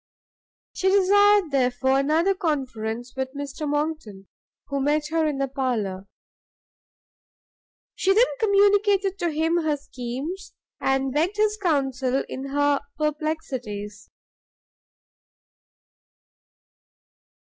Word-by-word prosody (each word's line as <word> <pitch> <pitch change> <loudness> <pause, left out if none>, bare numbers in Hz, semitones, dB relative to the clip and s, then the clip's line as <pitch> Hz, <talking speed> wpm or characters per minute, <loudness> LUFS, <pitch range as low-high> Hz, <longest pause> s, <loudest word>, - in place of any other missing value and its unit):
She 380 - +1
desired, 405 -2 +4
therefore, 265 0 +2
another 320 +7 +2
conference 250 - -3
with 265 +1 -4
Mr 285 +1 -5
Monckton, 295 -10 -3 0.4
who 280 -1 -1
met 295 +2 +1
her 325 -1 +2
in 295 -2 -2
the 275 0 0
parlour. 225 -8 -2 1.9
She 385 - +1
then 445 +5 +6
communicated 405 -2 +3
to 345 - 0
him 325 +2 +1
her 310 -3 0
schemes; 275 +6 -6 0.2
and 270 -1 0
begged 340 +8 0
his 425 0 +2
counsel 270 -6 0
in 265 - -6
her 285 0 +2 0.2
perplexities. 260 -10 -4
290 Hz, 95 wpm, -24 LUFS, 260-345 Hz, 1.9 s, then